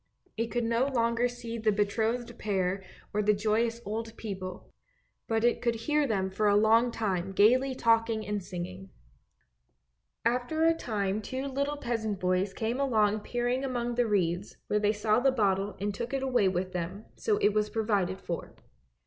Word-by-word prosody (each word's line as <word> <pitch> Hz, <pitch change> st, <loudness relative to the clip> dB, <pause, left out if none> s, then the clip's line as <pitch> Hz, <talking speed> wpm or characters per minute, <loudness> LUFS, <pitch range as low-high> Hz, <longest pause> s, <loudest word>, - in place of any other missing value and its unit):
It 230 Hz, +1 st, -1 dB
could 240 Hz, +1 st, -1 dB
no 230 Hz, +3 st, +2 dB
longer 235 Hz, -2 st, +1 dB
see 235 Hz, -1 st, -6 dB
the 220 Hz, -1 st, +2 dB
betrothed 225 Hz, +4 st, 0 dB
pair 190 Hz, -2 st, -1 dB, 0.3 s
or 210 Hz, -, +1 dB
the 210 Hz, 0 st, +3 dB
joyous 225 Hz, +3 st, +1 dB
old 225 Hz, +2 st, -4 dB
people, 185 Hz, -4 st, -6 dB, 0.5 s
but 225 Hz, 0 st, 0 dB
it 240 Hz, -, +2 dB
could 235 Hz, -1 st, +1 dB
hear 295 Hz, +6 st, +1 dB
them 190 Hz, -4 st, 0 dB
for 210 Hz, +2 st, +1 dB
a 205 Hz, -, +4 dB
long 225 Hz, +3 st, +5 dB
time 195 Hz, -5 st, -2 dB
gaily 255 Hz, +7 st, +4 dB
talking 225 Hz, -2 st, +2 dB
and 210 Hz, -1 st, -2 dB
singing. 185 Hz, +2 st, -7 dB, 1.4 s
After 250 Hz, +7 st, +1 dB
a 330 Hz, 0 st, +5 dB
time 210 Hz, -8 st, -2 dB
two 260 Hz, +5 st, -4 dB
little 280 Hz, +2 st, -1 dB
peasant 220 Hz, -6 st, -2 dB
boys 185 Hz, +1 st, +1 dB
came 225 Hz, +5 st, -2 dB
along 215 Hz, -6 st, +2 dB
peering 245 Hz, +4 st, -1 dB
among 240 Hz, -2 st, -2 dB
the 240 Hz, 0 st, +1 dB
reeds 185 Hz, -2 st, 0 dB
where 210 Hz, -, +1 dB
they 210 Hz, 0 st, +3 dB
saw 215 Hz, +1 st, +2 dB
the 270 Hz, +2 st, +4 dB
bottle 200 Hz, -4 st, 0 dB
and 205 Hz, +1 st, -1 dB
took 235 Hz, +6 st, -3 dB
it 270 Hz, -, -1 dB
away 250 Hz, -6 st, +3 dB
with 185 Hz, 0 st, -1 dB
them, 180 Hz, +4 st, -4 dB
so 430 Hz, -2 st, 0 dB
it 205 Hz, -, +3 dB
was 210 Hz, 0 st, +1 dB
provided 200 Hz, -5 st, 0 dB
for. 170 Hz, -, -5 dB
220 Hz, 175 wpm, -29 LUFS, 200-240 Hz, 1.4 s, long